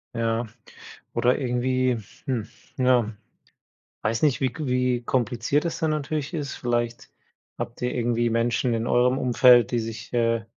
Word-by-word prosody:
Ja. 115 0 0 0.7
Oder 125 +4 +2
irgendwie, 130 0 0 0.3
hm, 120 -6 -2 0.3
ja, 125 -4 +2 0.9
weiß 110 +1 0
nicht, 145 -4 +3
wie 130 - +2
k 150 -2 -5
wie 125 -1 +1
kompliziert 125 +4 0
es 170 - -3
dann 160 -2 +1
natürlich 150 +1 -3
ist. 145 -3 -3
Vielleicht 120 -1 -2 0.5
habt 120 - -6
ihr 125 +1 -1
irgendwie 120 0 +1
Menschen 115 +1 +1
in 115 +1 -2
eurem 125 +2 +3
Umfeld, 125 -2 +5
die 120 - +1
sich, 110 0 -7
äh, 115 -1 +1
120 Hz, 145 wpm, -25 LUFS, 115-130 Hz, 0.9 s, Umfeld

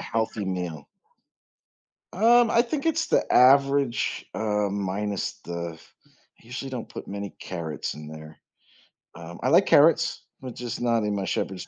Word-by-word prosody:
healthy 110 -2 -2
meal. 90 -6 -4 1.3
Um, 235 +4 +5
I 235 - +4
think 275 +5 -4
it's 325 0 +1
the - - +3
average, 135 0 +3
uh, 105 -2 0
minus 100 0 -3
the 85 -1 -5 0.3
I - - -31
usually 130 +3 -6
don't 125 -3 -5
put - - -9
many 100 0 -6
carrots 80 -4 -5
in 75 0 -10
there. 80 0 -11 0.8
Um, 85 +1 -10
I - - +2
like - - +5
carrots, - - +4 0.2
but 130 -2 -8
just 120 -1 -5
not 115 -2 +1
in 105 -1 -1
my 100 -1 -2
shepherd's 95 -1 -3
105 Hz, 150 wpm, -25 LUFS, 90-130 Hz, 1.3 s, Um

